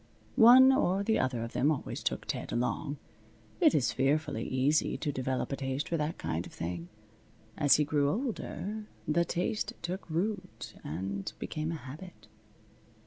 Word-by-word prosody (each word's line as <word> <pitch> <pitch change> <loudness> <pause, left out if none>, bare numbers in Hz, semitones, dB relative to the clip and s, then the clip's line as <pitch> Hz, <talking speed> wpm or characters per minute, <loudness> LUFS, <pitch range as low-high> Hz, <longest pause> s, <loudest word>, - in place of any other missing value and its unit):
One 255 +2 +9
or 200 -8 +2
the 220 +2 +2
other 130 -3 0
of 115 - -6
them 140 - +2
always 150 -4 -2
took - - -2
Ted - - -4
along. 140 +5 -1 0.6
It - - +5
is 135 -5 +2
fearfully 135 -4 +1
easy 135 +4 +1
to 150 - -2
develop 130 0 -2
a - - 0
taste 135 +2 -3
for 170 - -1
that 150 +2 -2
kind 80 +3 -3
of - - -14
thing. 85 0 -5 0.7
As 145 -2 +5
he 150 - +3
grew 145 -1 +1
older, 215 - -3 0.2
the 170 +3 +2
taste 180 +6 -1
took 180 +1 -4
root 185 +3 -3
and 95 +5 -4
became 155 +1 -3
a - - -2
habit. 155 +6 -10
150 Hz, 160 wpm, -31 LUFS, 130-185 Hz, 0.7 s, One